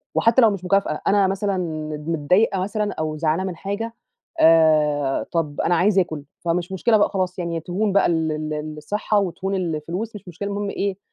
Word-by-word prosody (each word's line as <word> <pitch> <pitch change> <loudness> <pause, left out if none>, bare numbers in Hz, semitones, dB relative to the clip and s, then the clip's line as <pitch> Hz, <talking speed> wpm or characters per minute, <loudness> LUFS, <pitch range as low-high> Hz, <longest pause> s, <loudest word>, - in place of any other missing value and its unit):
وحتّى 230 +3 +4
لو 225 - +7
مش 190 -2 -5
مكافأة، 195 -5 +1
أنا 200 -1 +4
مثلًا 195 0 -1
ند 155 -2 -4
متضايقة 180 +6 +2
مثلًا 210 +2 -2
أو 155 -1 -3
زعلانة 160 +3 0
من 175 - -6
حاجة، 205 +6 -4 0.5
آآ 155 -4 +4
طَب 155 -4 -1
أنا 175 - +2
عايزة 190 +2 +4
آكُل. 155 -4 -4 0.2
فمش 175 +2 -2
مشكلة 215 +4 +3
بقى 205 - +3
خلاص، 185 -2 -2
يعني 170 -1 -2
تهون 190 +5 -1
بقى 200 - +4
ال 160 -2 +1
ال 155 0 -4
الصِحّة 205 +6 0
وتهون 195 +1 -2
الفلوس، 175 +5 -3
مش 195 - -10
مشكلة 190 +4 -5
المهم 200 0 -3
إيه، 195 -1 -2
180 Hz, 185 wpm, -22 LUFS, 155-200 Hz, 0.5 s, لو